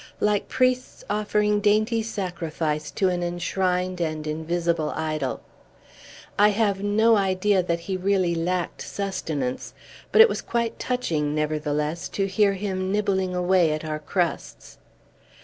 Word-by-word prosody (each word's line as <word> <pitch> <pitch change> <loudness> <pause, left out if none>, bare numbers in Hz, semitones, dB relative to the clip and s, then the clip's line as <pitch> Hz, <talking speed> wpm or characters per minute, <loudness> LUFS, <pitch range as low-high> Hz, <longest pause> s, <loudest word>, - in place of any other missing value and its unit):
like 210 -1 +1
priests 255 0 0
offering 210 0 +1
dainty 215 +2 +2
sacrifice 170 -7 -3
to 190 - 0
an 180 -1 0
enshrined 180 +1 -1
and 155 -2 -2
invisible 160 +1 -1
idol. 155 -4 -2 1.0
I 210 +1 +7
have 205 -2 +1
no 220 +2 +4
idea 195 0 +2
that 170 -1 -2
he 190 +2 -3
really 185 -2 +1
lacked 175 +2 -2
sustenance; 160 -10 -3 0.4
but - - +3
it 450 - +11
was - - -3
quite 235 -1 -2
touching, 160 -13 -1
nevertheless, 150 +1 -1
to 195 - +2
hear 200 +1 +2
him 190 -1 -3
nibbling 195 -3 0
away 180 -3 +3
at 155 +1 -4
our 155 -1 -3
crusts. 170 +3 -3
185 Hz, 130 wpm, -24 LUFS, 160-205 Hz, 1.0 s, it